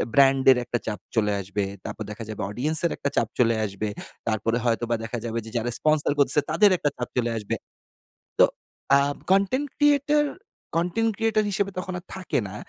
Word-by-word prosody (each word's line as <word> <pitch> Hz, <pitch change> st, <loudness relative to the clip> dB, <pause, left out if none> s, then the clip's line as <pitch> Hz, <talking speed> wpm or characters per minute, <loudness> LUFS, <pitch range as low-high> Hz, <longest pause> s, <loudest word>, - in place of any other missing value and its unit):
Brand 135 Hz, -1 st, +5 dB
এর 130 Hz, -, +4 dB
একটা 120 Hz, 0 st, -1 dB
চাপ 105 Hz, -1 st, -3 dB, 0.2 s
চলে 105 Hz, -2 st, +2 dB
আসবে, 100 Hz, +2 st, -2 dB, 0.2 s
তারপর 110 Hz, -, -5 dB
দেখা 110 Hz, +2 st, -7 dB
যাবে 110 Hz, -, -5 dB
অডিয়েন্স 145 Hz, +9 st, -1 dB
এর 170 Hz, -, +2 dB
একটা 140 Hz, -, -1 dB
চাপ 115 Hz, -, +2 dB
চলে 115 Hz, -1 st, +4 dB
আসবে। 105 Hz, +1 st, -3 dB, 0.4 s
তারপরে 115 Hz, +1 st, 0 dB
হয়তোবা 120 Hz, 0 st, +1 dB
দেখা 120 Hz, +2 st, -4 dB
যাবে 115 Hz, 0 st, -3 dB
যে, -, -, -8 dB
যারা 120 Hz, +1 st, -1 dB
স্পন্সর 155 Hz, -1 st, +2 dB
করতেছে, 145 Hz, +1 st, +4 dB
তাদের 185 Hz, +6 st, +6 dB
একটা 150 Hz, -, +1 dB
চাপ 125 Hz, -, -3 dB
চলে 120 Hz, -1 st, +1 dB
আসবে। 105 Hz, -2 st, -3 dB, 0.8 s
তো, -, -, +8 dB, 0.5 s
আ -, -, +6 dB, 0.3 s
কনটেন্ট 200 Hz, +9 st, +3 dB
ক্রিয়েটর, 295 Hz, 0 st, +3 dB, 0.5 s
কনটেন্ট 180 Hz, +7 st, +1 dB
ক্রিয়েটর 225 Hz, -1 st, +1 dB
হিসেবে 200 Hz, 0 st, 0 dB
তখন 185 Hz, +1 st, -4 dB
আর 180 Hz, -, -11 dB
থাকে 190 Hz, -1 st, -2 dB
না। 95 Hz, -, -9 dB
135 Hz, 185 wpm, -25 LUFS, 115-190 Hz, 0.8 s, তো